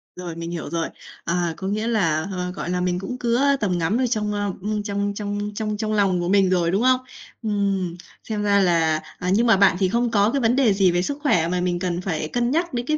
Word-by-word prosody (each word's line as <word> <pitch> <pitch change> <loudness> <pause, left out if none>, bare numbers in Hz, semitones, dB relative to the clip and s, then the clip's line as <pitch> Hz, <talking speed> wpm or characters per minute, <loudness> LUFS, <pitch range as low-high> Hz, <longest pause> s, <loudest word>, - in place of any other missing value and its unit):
Rồi, 175 -2 -6
mình 170 0 -5
hiểu 170 -4 -5
rồi. 165 +1 -2 0.4
À, 170 -1 0
có 190 - -5
nghĩa 215 +3 -1
là, 165 -8 +1
ờ, 180 -1 -3
gọi 180 -2 -5
là, 180 0 -1
mình 180 0 0
cũng 250 +7 -5
cứa 250 +4 +2
tầm 185 -4 0
ngắm 175 +6 0
ở 255 0 +1
trong, 210 -3 -1
ơ, 205 -1 -1
ưm, 210 +1 -2
trong 200 -1 -2
trong 205 0 -3
trong 215 -1 -2
trong 215 0 -2
lòng 195 -4 +2
của 175 - -2
mình 195 -1 +4
rồi, 175 -2 +2
đúng 195 +4 +1
không? 255 0 +4 0.4
Ừm, 200 -4 -1 0.3
xem 215 -2 -3
ra 200 -1 +3
là 165 -4 +3 0.2
à, 180 - -2
nhưng 230 +4 +3
mà 225 - +5
bạn 195 -2 +5
thì 190 -2 +2
không 235 +3 0
có 210 +1 +3
cái 280 - 0
vấn 235 +1 +3
đề 255 -6 +4
gì 195 -2 +3
về 175 0 +1
sức 280 +10 -3
khỏe 175 - +3
mà 180 +1 -1
mình 175 -1 -1
cần 175 -1 -2
phải 165 -5 -2
cân 240 +7 -1
nhắc 335 +2 0
đến 240 -1 -2
cái 305 +3 0
200 Hz, 260 wpm, -23 LUFS, 180-220 Hz, 0.4 s, mà